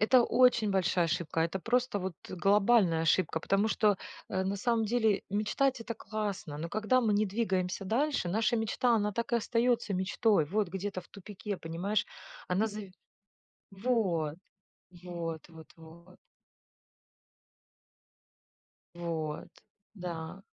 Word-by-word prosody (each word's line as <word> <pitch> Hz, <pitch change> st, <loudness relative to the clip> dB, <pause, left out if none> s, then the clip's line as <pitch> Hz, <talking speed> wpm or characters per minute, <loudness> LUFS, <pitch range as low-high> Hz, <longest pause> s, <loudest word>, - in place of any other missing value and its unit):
Это 240 Hz, +3 st, +6 dB
очень 250 Hz, -4 st, +4 dB
большая 185 Hz, -2 st, +2 dB
ошибка, 165 Hz, -1 st, -1 dB
это 170 Hz, +4 st, 0 dB
просто 245 Hz, -1 st, +1 dB
вот 185 Hz, -1 st, -4 dB
глобальная 195 Hz, -1 st, +3 dB
ошибка, 165 Hz, 0 st, +2 dB
потому 195 Hz, +5 st, +1 dB
что, 210 Hz, -2 st, +3 dB, 0.3 s
э, 190 Hz, -, -1 dB
на 195 Hz, +1 st, -1 dB
самом 225 Hz, +2 st, +1 dB
деле 220 Hz, -2 st, +2 dB
мечтать 215 Hz, +6 st, +1 dB
это 230 Hz, 0 st, -5 dB
классно. 205 Hz, -8 st, -4 dB
Но 165 Hz, -, -4 dB
когда 215 Hz, +7 st, +2 dB
мы 220 Hz, -4 st, +2 dB
не 210 Hz, +1 st, +3 dB
двигаемся 190 Hz, -2 st, -1 dB
дальше, 255 Hz, 0 st, 0 dB
наша 220 Hz, +5 st, +1 dB
мечта 230 Hz, +2 st, +2 dB
она 210 Hz, -1 st, 0 dB
так 235 Hz, +2 st, -3 dB
и -, -, +5 dB
остаётся 235 Hz, -2 st, +1 dB
мечтой. 190 Hz, 0 st, +2 dB
Вот 205 Hz, +3 st, 0 dB
где-то 190 Hz, +1 st, -4 dB
в 175 Hz, -, -19 dB
тупике, 200 Hz, +1 st, -6 dB
понимаешь? 185 Hz, +6 st, -2 dB, 0.4 s
Она 190 Hz, +5 st, +2 dB
зави 205 Hz, -3 st, -7 dB, 0.8 s
вот 190 Hz, -8 st, 0 dB, 0.7 s
вот 170 Hz, -3 st, -5 dB
вот 160 Hz, -1 st, -13 dB
вот. 170 Hz, +3 st, -15 dB, 2.8 s
Вот, 165 Hz, -3 st, -4 dB, 0.5 s
да. 175 Hz, -2 st, -6 dB
200 Hz, 130 wpm, -31 LUFS, 175-220 Hz, 2.8 s, Это